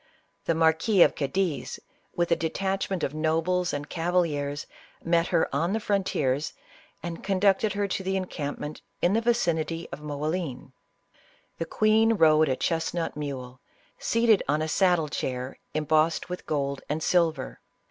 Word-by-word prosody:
The 165 - +1
Marquis 165 +5 +4
of - - +3
Cadiz, 145 -2 -2 0.4
with 175 0 0
a - - +6
detachment 190 +3 -2
of 140 - -1
nobles 165 +3 +1
and 145 0 -4
cavaliers 160 -5 -1 0.4
met 170 0 +2
her 170 -3 +2
on 170 +7 +1
the 220 - +1
frontiers, 155 -10 0 0.5
and 170 -1 -5
conducted 195 +1 +2
her 205 0 0
to 190 - -1
the 190 0 -1
encamp 155 -6 -4
ment 150 +1 -6 0.2
in 175 - +4
the 225 - +2
vicinity 170 -8 0
of 140 - -7
Moclin. 150 -2 -3 0.4
" - - -33
The 165 - -1
queen 215 +5 +3
rode 155 -5 +5
a 130 - +2
chestnut 165 +2 -1
mule, 130 -4 -6 0.4
seated 230 -2 +3
on 150 +2 +1
a - - -2
saddle 175 -2 +2
chair, 130 -2 -4 0.2
embossed 155 +2 +2
with 180 - -6
gold 140 -2 -1
and 155 +2 -1
silver. 170 -3 +1
165 Hz, 150 wpm, -27 LUFS, 150-185 Hz, 0.5 s, a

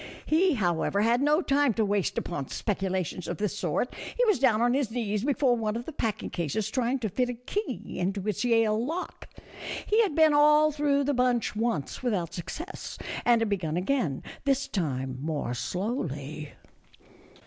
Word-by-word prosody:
He, 335 +1 +3
however, 185 -1 +1
had 235 +3 +3
no 300 +4 +3
time 280 -5 +2
to 220 - +2
waste 200 -2 0
upon 145 -6 -3
speculations 190 -4 -2
of 175 - -3
this 205 -1 -1
sort; 190 - -1 0.2
he - - +4
was 425 - +3
down 240 -5 +4
on 240 +1 +3
his 270 -4 +1
knees 215 -3 -2
before 270 -2 +2
one 220 -2 -1
of 235 +1 -4
the - - -6
packing 225 -8 -3
cases 175 +5 -2
trying 255 0 +1
to 220 - 0
fit 250 +5 0
a 245 - -3
key 400 - -4
into 195 +2 -2
its 210 +1 -1
Yale 225 -2 +3
lock. 325 +8 -5 0.6
He 435 +2 +4
had 395 -10 0
been 315 -2 +5
all 300 +1 +6
through 290 -1 +1
the 285 +1 +1
bunch 250 -4 +1
once, 215 - -1
without 200 -10 -1
success, 310 - -6 0.3
and 235 -1 +5
had 225 - +1
begun 170 -5 -1
again, 180 - 0 0.2
this 275 0 +1
time 130 -8 -2
more 150 -5 -2
slowly. 155 - -3
225 Hz, 175 wpm, -28 LUFS, 185-275 Hz, 0.6 s, all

